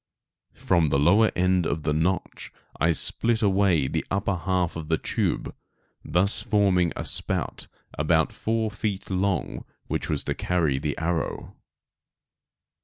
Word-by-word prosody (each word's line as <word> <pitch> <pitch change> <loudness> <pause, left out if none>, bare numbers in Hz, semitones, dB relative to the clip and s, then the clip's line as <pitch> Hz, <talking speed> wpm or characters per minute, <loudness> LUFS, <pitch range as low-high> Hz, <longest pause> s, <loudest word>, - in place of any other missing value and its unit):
From 85 -4 +2
the 70 - +1
lower 100 +10 +4
end 90 -1 +2
of 75 +1 -2
the 75 - 0
notch 85 +5 -2 0.3
I 85 - +3
split 115 +8 +1
away 95 -8 +3
the - - -2
upper 100 0 0
half 90 0 -1
of 80 -2 -6
the 80 0 +1
tube, - - -2 0.5
thus 95 +4 +1
forming 95 -5 +2
a - - -4
spout - - 0 0.3
about - - +2
four 110 -1 -1
feet 105 -2 -4
long 95 -3 -1 0.2
which - - -3
was 75 -3 0
to - - -2
carry 80 -7 0
the 75 0 -3
arrow. 85 0 -3
90 Hz, 140 wpm, -25 LUFS, 80-100 Hz, 0.5 s, lower